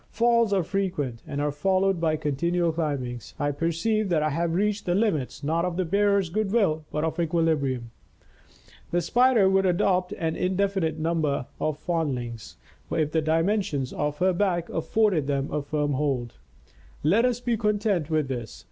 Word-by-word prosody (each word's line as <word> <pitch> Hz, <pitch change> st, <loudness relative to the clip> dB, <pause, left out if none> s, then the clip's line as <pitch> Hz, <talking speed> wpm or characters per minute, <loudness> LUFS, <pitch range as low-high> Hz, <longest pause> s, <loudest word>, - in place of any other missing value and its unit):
Falls 235 Hz, -1 st, +2 dB
are 195 Hz, -3 st, +2 dB
frequent 160 Hz, -, -2 dB
and 145 Hz, -, -4 dB
are 145 Hz, 0 st, 0 dB
followed 190 Hz, +4 st, +1 dB
by 160 Hz, -2 st, +2 dB
continual 165 Hz, +3 st, 0 dB
climbings. 140 Hz, -7 st, -3 dB
I 145 Hz, 0 st, +1 dB
perceive 170 Hz, +8 st, 0 dB
that 160 Hz, -4 st, +2 dB
I 155 Hz, -, +1 dB
have 165 Hz, +2 st, -1 dB
reached 205 Hz, +1 st, 0 dB
the 175 Hz, -, +2 dB
limits 160 Hz, -, 0 dB
not 165 Hz, +3 st, 0 dB
of 180 Hz, -1 st, -2 dB
the 185 Hz, -, 0 dB
bearer's 200 Hz, +1 st, +2 dB
good 210 Hz, +1 st, -1 dB
will, 160 Hz, -9 st, +1 dB
but 150 Hz, -, -1 dB
of 160 Hz, +2 st, -2 dB
equilibrium. 155 Hz, -8 st, 0 dB, 1.0 s
The 175 Hz, -, +1 dB
Spider 240 Hz, +2 st, +4 dB
would 190 Hz, 0 st, +3 dB
adopt 180 Hz, +1 st, +1 dB
an 160 Hz, -5 st, -2 dB
in 185 Hz, +1 st, -1 dB
definite 195 Hz, -5 st, 0 dB
further 155 Hz, -, -5 dB
number 155 Hz, -5 st, 0 dB
of 155 Hz, -1 st, -1 dB
foundlings, 130 Hz, -, -3 dB, 0.3 s
if 155 Hz, -2 st, 0 dB
the 160 Hz, -, +1 dB
dimensions 165 Hz, -3 st, 0 dB
of 150 Hz, 0 st, -2 dB
her 185 Hz, +1 st, +2 dB
back 175 Hz, -2 st, 0 dB
afforded 175 Hz, -3 st, +1 dB
them 140 Hz, -1 st, -1 dB
a 150 Hz, -, -1 dB
firm 145 Hz, 0 st, -1 dB
hold. 130 Hz, -4 st, -1 dB, 0.7 s
Let 195 Hz, +10 st, +4 dB
us 245 Hz, -1 st, +1 dB
be 240 Hz, -1 st, 0 dB
content 210 Hz, -6 st, 0 dB
with 155 Hz, -3 st, +1 dB
this. 120 Hz, -4 st, -5 dB
165 Hz, 175 wpm, -26 LUFS, 150-195 Hz, 1.0 s, Spider